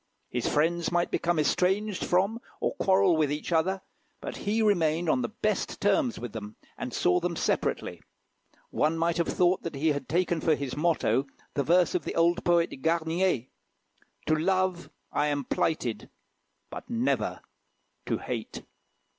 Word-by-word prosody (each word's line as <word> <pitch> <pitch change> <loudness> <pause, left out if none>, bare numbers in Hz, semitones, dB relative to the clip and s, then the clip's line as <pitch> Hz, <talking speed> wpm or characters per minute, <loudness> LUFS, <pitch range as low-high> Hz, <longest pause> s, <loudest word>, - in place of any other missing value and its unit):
His 120 -1 -1
friends 165 +3 +1
might 175 0 +1
become 175 0 0
estranged 190 +7 +1
from 195 +6 +1 0.2
or - - 0
quarrel 190 -2 +4
with 155 -2 +1
each 150 +4 -4
other; 185 +4 +1 0.4
but - - -6
he 220 +2 0
remained 170 -5 +2
on 135 -5 +2
the 120 - -2
best 215 -2 -1
of - - -13
terms 240 +4 +2
with 120 -3 -6
them, 105 -1 -7 0.2
and - - -5
saw 90 - +2
them 175 -1 -2
separately. - - -1 0.7
One 155 +2 +1
might 170 +1 +1
have 170 - +1
thought 180 +1 +2
that 165 - -5
he 155 +4 +1
had 145 -1 -2
taken 175 0 +1
for 160 -2 +3
his 140 -3 -4
motto 145 -5 +1 0.3
the 140 - 0
verse 175 +5 +3
of 180 - 0
the - - -4
old 170 +1 +3
poet, 170 -5 +1
Garnier 165 -3 +1 0.8
"To 155 - +2
love 185 +1 0 0.2
I 145 - +1
am 145 -1 -1
plighted, 125 -8 -1 0.6
but - - -8
never 240 +1 0 0.7
to - - 0
hate." - - -5
170 Hz, 165 wpm, -28 LUFS, 150-185 Hz, 0.8 s, quarrel